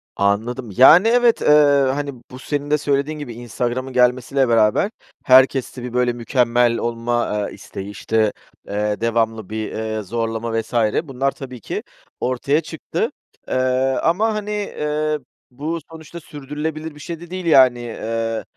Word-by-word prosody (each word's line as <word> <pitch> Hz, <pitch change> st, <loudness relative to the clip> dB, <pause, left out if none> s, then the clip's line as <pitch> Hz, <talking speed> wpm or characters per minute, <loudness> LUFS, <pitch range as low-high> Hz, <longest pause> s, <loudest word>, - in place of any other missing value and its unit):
Anladım. 110 Hz, +4 st, -1 dB
Yani, 170 Hz, -, +8 dB
evet, 240 Hz, 0 st, +3 dB
eee, -, -, -1 dB, 0.5 s
hani, 145 Hz, -1 st, -3 dB, 0.2 s
bu 130 Hz, -, -9 dB
senin 145 Hz, +1 st, -3 dB
de 150 Hz, -, +4 dB
söylediğin 145 Hz, +1 st, -1 dB
gibi 125 Hz, -5 st, -6 dB
Instagram’ın 120 Hz, +2 st, -4 dB
gelmesiyle 125 Hz, +1 st, +2 dB
beraber 115 Hz, -, +3 dB, 0.3 s
herkeste 130 Hz, -1 st, +4 dB
bir, 125 Hz, -1 st, -6 dB
böyle, 125 Hz, -1 st, +1 dB
mükemmel 120 Hz, -1 st, +2 dB
olma, 115 Hz, -3 st, -1 dB
eee, -, -, -11 dB
isteği, 100 Hz, +1 st, -8 dB
işte, 110 Hz, +1 st, 0 dB, 0.3 s
eee, 105 Hz, +1 st, -2 dB
devamlı 115 Hz, -3 st, 0 dB
bir, 110 Hz, 0 st, -4 dB
eee, 110 Hz, 0 st, -3 dB
zorlama 115 Hz, +2 st, -2 dB
vs. 115 Hz, -, -16 dB, 0.3 s
bunlar 135 Hz, -1 st, -1 dB
tabii 130 Hz, -3 st, -9 dB
ki -, -, -4 dB, 0.4 s
ortaya 140 Hz, +5 st, 0 dB
çıktı. 165 Hz, -, -3 dB, 0.4 s
Eee, -, -, -4 dB, 0.5 s
ama, 210 Hz, +7 st, +2 dB
hani, 210 Hz, 0 st, -4 dB
eee, 155 Hz, -7 st, -2 dB, 0.3 s
bu 155 Hz, +6 st, -4 dB
sonuçta 160 Hz, +1 st, -10 dB
sürdürülebilir 150 Hz, +2 st, -6 dB
bir -, -, -13 dB
şey 170 Hz, 0 st, -6 dB
de 175 Hz, 0 st, -11 dB
değil 185 Hz, -1 st, -5 dB
yani. 130 Hz, -6 st, +5 dB
Eee, 115 Hz, -1 st, -3 dB
125 Hz, 145 wpm, -20 LUFS, 115-150 Hz, 0.5 s, Yani